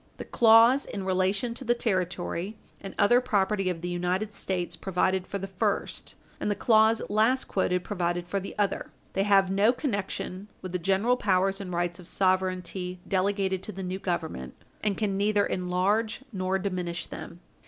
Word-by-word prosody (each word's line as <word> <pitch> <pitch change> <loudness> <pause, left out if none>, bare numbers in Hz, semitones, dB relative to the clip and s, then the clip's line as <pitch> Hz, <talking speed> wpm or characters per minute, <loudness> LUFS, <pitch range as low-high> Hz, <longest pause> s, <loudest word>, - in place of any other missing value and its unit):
The - - -6
clause 230 +4 +6
in 195 -2 -5
relation 190 +6 +1
to 255 - -8
the 240 -1 +2
territory 185 -2 -2 0.2
and 195 - -8
other 240 +5 +5
property 200 -5 +1
of 170 -2 -3
the 175 - -3
United 180 +4 -1
States 180 -3 -2
provided 185 0 0
for 200 - -3
the 195 - -4
first, 190 -1 -2 0.2
and - - -1
the 205 - +1
clause 220 +1 +4
last 220 +6 +2
quoted 180 -2 0
provided 175 -3 -2
for 200 +2 -1
the 195 - -8
other. 205 -1 0 0.2
They 195 - +1
have 195 -1 +4
no 200 +4 +4
connection 200 -6 -3 0.2
with 185 - -5
the 180 - -1
general 195 +8 +2
powers 195 -2 +1
and 185 -2 -6
rights 175 0 -1
of 175 - -9
sovereignty 185 -1 -1
delegated 190 0 0
to 215 - -6
the 190 -1 -6
new 185 +1 -3
Government, 160 - -3 0.3
and 205 -2 0
can 200 -3 0
neither 205 0 +2
enlarge 190 +6 0
nor 185 0 0
diminish 180 -3 -3
them. 175 - -9
190 Hz, 175 wpm, -27 LUFS, 180-210 Hz, 0.3 s, clause